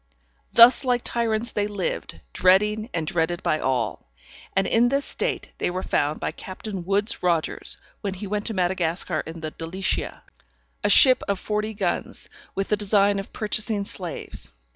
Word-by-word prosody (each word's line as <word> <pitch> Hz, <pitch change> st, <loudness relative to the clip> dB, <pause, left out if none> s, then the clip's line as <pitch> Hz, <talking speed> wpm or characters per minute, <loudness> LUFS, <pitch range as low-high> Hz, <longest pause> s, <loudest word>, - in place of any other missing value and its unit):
_] -, -, -35 dB
Thus 235 Hz, +3 st, +8 dB
like 245 Hz, -2 st, +1 dB
tyrants 230 Hz, 0 st, -1 dB
they 205 Hz, 0 st, 0 dB
lived, 205 Hz, -3 st, -4 dB
dreading, 210 Hz, +4 st, +3 dB
and 165 Hz, -2 st, -2 dB
dreaded 170 Hz, +2 st, -1 dB
by 155 Hz, -, +1 dB
all, 130 Hz, -, -2 dB, 0.5 s
and 195 Hz, -, +3 dB
in 235 Hz, +4 st, +3 dB
this 275 Hz, +2 st, 0 dB
state -, -, -2 dB
they -, -, +1 dB
were 185 Hz, +1 st, -3 dB
found 150 Hz, +2 st, 0 dB
by -, -, -2 dB
Captain 190 Hz, 0 st, -7 dB
Woods 200 Hz, +6 st, 0 dB
Rogers, 170 Hz, -3 st, -1 dB, 0.2 s
when 195 Hz, -2 st, -3 dB
he 200 Hz, +3 st, -6 dB
went 205 Hz, +1 st, -2 dB
to 225 Hz, -, -3 dB
Madagascar 180 Hz, -2 st, 0 dB
in 165 Hz, 0 st, -8 dB
the 155 Hz, -1 st, -4 dB
Delicia, 175 Hz, +5 st, -3 dB, 0.6 s
a -, -, +3 dB
ship 260 Hz, -3 st, +7 dB
of 200 Hz, -2 st, 0 dB
forty 210 Hz, +1 st, -2 dB
guns, 190 Hz, -4 st, -2 dB, 0.3 s
with 195 Hz, 0 st, -2 dB
the 210 Hz, -, +2 dB
design 205 Hz, -1 st, +3 dB
of 195 Hz, -, -7 dB
purchasing 215 Hz, -1 st, -1 dB
slaves. 180 Hz, -, -6 dB
200 Hz, 165 wpm, -24 LUFS, 175-215 Hz, 0.6 s, Thus